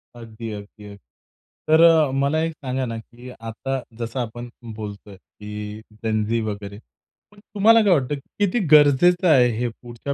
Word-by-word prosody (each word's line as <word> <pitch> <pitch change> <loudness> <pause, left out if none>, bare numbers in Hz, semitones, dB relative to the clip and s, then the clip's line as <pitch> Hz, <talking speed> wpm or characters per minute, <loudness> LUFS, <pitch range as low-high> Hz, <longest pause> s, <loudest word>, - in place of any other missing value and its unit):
अगदी, 115 -1 -8
अगदी, 105 0 -10
अगदी. 100 0 -11 0.7
तर 160 +1 +5
अ, 160 -4 +5
मला 140 +3 +1
एक 165 0 -2
सांगा 130 -3 -3
ना, 115 -2 -5
की 120 +2 -13
आता 125 +3 -5 0.2
जसं 115 +2 -4
आपण 120 0 -5 0.3
बोलतोय 105 -2 -9
की 105 +2 -9
जेन 110 0 -1
झी 115 +2 0
वगैरे 100 -1 -6 0.5
पण 205 - -19
तुम्हाला 220 +2 +4
काय 200 -3 +4
वाटतं 145 -2 0
किती 200 - -2
गरजेचं 155 +5 +5
आहे 125 -5 +5
हे 120 +1 -1
पुढच्या 120 +4 -7
120 Hz, 160 wpm, -22 LUFS, 110-150 Hz, 0.7 s, तर